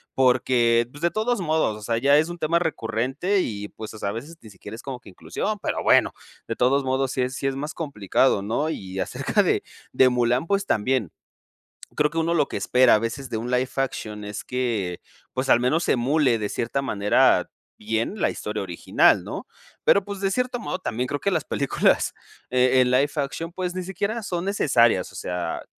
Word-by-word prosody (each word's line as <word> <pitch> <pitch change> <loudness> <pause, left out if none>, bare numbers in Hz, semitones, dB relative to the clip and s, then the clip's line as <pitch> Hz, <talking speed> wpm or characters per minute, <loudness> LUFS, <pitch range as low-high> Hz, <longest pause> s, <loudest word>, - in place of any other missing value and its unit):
porque 125 -2 +3
pues 145 - -13
de 170 0 +2
todos 225 +2 0
modos, 155 -10 0
o 110 - -12
sea, 115 +2 -1
ya 140 +4 +4
es 155 +2 +3
un 175 - -6
tema 170 +2 +2
recurrente 135 - -1
y, 105 - -4
pues 110 -1 -9
o 110 - -10
sea, 100 - -2
a - - -2
veces 140 +10 -7
ni 110 - -13
siquiera 100 +2 -10
es 115 - -10
como 130 -3 -6
que 105 - -15
inclusión, 90 - -4
pero - - -2
bueno, - - +4 0.4
de - - -3
todos 135 +3 +2
modos, 130 0 0
sí 130 - -1
es 130 +1 -2
sí 135 -1 -2
es 135 - -1
más 150 +4 -4
complicado, 130 - +1
¿no? 115 +10 -1
Y 95 -9 -5
acerca - - 0
de - - +1 0.3
de 130 -1 +5
Mulán, 125 +3 +1
pues 200 0 +1
también. 110 - 0 0.8
Creo 150 0 +2
que 165 - -1
uno 165 +1 +1
lo 150 -3 +2
que - - -7
espera 125 -1 +4
a - - +2
veces 125 +4 -4
de 110 - -1
un 120 +2 -4
live 125 +1 +1
action 110 -6 -3
es 105 0 -6
que, 115 -9 -2 0.3
pues 130 +1 -2
al 120 - +6
menos 155 +8 +1
emule 130 0 +2
de 105 -1 -2
cierta 135 +4 -2
manera 105 -4 +3 0.3
bien, 110 - -2
la - - +3
historia 105 0 -4
original, 85 -3 +2
¿no? - - -7 0.4
Pero 200 - +5
pues 200 -1 -6
de 195 - 0
cierto 250 +3 -1
modo, 185 - -3
también 125 -8 -3
creo 145 +1 -3
que 200 - 0
las 160 - 0
películas 140 - +1 0.4
en 130 0 +4
en 125 - +2
live 135 +3 +3
action, 150 +3 -3
pues 180 0 -3
ni 185 - -2
siquiera 200 +5 -3
son 180 -3 -3
necesarias. 135 - +2
O - - -15
sea, 90 -1 -4
130 Hz, 210 wpm, -24 LUFS, 115-160 Hz, 0.8 s, al